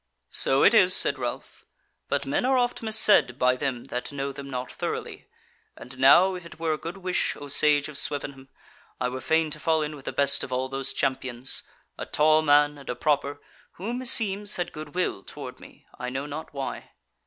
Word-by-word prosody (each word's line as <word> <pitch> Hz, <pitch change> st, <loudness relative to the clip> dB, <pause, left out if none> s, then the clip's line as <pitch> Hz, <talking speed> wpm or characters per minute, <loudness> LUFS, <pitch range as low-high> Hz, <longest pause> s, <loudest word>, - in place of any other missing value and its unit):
"So 135 Hz, +1 st, +2 dB
it 210 Hz, -, +6 dB
is," 185 Hz, -4 st, +6 dB
said -, -, +3 dB
Ralph; -, -, -6 dB, 0.5 s
"but -, -, -1 dB
men -, -, -1 dB
are 260 Hz, +1 st, +2 dB
oft 245 Hz, -1 st, 0 dB
mis 220 Hz, -1 st, 0 dB
said 205 Hz, -, +4 dB
by 125 Hz, -1 st, +3 dB
them 130 Hz, -3 st, -3 dB
that 125 Hz, +3 st, -4 dB
know 140 Hz, 0 st, -4 dB
them 140 Hz, 0 st, -9 dB
not 125 Hz, -1 st, -5 dB
thoroughly: -, -, -5 dB, 0.5 s
and 125 Hz, +2 st, -11 dB
now, 175 Hz, +8 st, +6 dB
if 180 Hz, -1 st, -7 dB
it 170 Hz, -, -13 dB
were 165 Hz, -1 st, 0 dB
a -, -, -3 dB
good 170 Hz, +4 st, -7 dB
wish, 185 Hz, -1 st, -1 dB
O 145 Hz, -, -9 dB
Sage 145 Hz, 0 st, +4 dB
of 150 Hz, -2 st, -1 dB
Swevenham, 140 Hz, -2 st, -3 dB, 0.5 s
I 125 Hz, -, -1 dB
were 130 Hz, +1 st, -6 dB
fain 160 Hz, +3 st, +1 dB
to 150 Hz, -, -4 dB
fall 160 Hz, 0 st, +1 dB
in 150 Hz, 0 st, -5 dB
with 140 Hz, -, -14 dB
the -, -, -3 dB
best 140 Hz, 0 st, +3 dB
of -, -, -7 dB
all 130 Hz, +1 st, -2 dB
those 135 Hz, 0 st, -2 dB
champions, 130 Hz, -1 st, -2 dB, 0.4 s
a -, -, -5 dB
tall 155 Hz, +1 st, +3 dB
man 145 Hz, -1 st, +3 dB
and 140 Hz, -, -12 dB
a 125 Hz, -, -2 dB
proper, 145 Hz, +1 st, -1 dB, 0.3 s
who, 210 Hz, +7 st, -5 dB
meseems, 210 Hz, -5 st, +2 dB
had 175 Hz, -1 st, -4 dB
good 155 Hz, 0 st, -9 dB
will 180 Hz, -, -1 dB
toward 130 Hz, +2 st, -10 dB
me, -, -, -16 dB
I 125 Hz, 0 st, -4 dB
know 135 Hz, +2 st, -4 dB
not 150 Hz, +2 st, -7 dB
why." 140 Hz, -2 st, -6 dB
145 Hz, 210 wpm, -25 LUFS, 135-170 Hz, 0.5 s, it